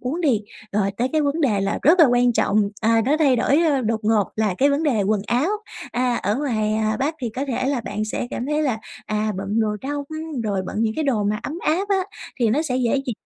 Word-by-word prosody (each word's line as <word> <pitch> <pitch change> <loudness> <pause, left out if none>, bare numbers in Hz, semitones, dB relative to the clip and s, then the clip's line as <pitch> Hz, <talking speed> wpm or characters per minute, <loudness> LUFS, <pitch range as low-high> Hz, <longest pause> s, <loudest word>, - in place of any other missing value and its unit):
uống 270 +8 -3
đi, 265 -11 +2 0.3
rồi 200 -1 +1
tới 245 +2 0
cái 310 -1 +2
vấn 290 +3 0
đề 220 -10 +2
là 195 +1 -1
rất 335 +6 +5
là 320 - +9
quan 245 -1 +3
trọng, 215 -2 +2 0.2
à, 225 +1 +3
nó 285 +4 +2
thay 275 -5 +4
đổi 270 +5 +3 0.3
đột 220 0 0
ngột 210 -2 +2
là 215 -4 +1
cái 280 +2 +4
vấn 285 +2 +1
đề 255 -10 +2
quần 205 +1 +1
áo. 250 - +1 0.4
À, 250 0 +1
ở 205 +2 -1
ngoài 220 -7 0 0.3
Bắc 290 +4 0
thì 240 -3 -2
có 255 +5 -3
thể 255 0 -1
là 275 -3 0
bạn 215 -1 -3
sẽ 215 +2 -3
cảm 245 - -4
thấy 300 +1 0
là, 255 -6 0 0.3
à, 215 0 -1
bận 200 +3 -1
đồ 210 -1 0
đông 285 +1 -3 0.4
rồi 200 -3 -1
bận - - -6
những 220 -1 0
cái 315 - -1
đồ 230 -7 +1
mà 210 +1 -1
ấm 310 +4 -5
áp 365 +6 0
á, 395 - +3 0.4
thì 230 - +3
nó 290 +8 +2
sẽ 255 -6 -1
dễ 245 -2 +1
dị 245 - -1
245 Hz, 250 wpm, -22 LUFS, 215-285 Hz, 0.4 s, là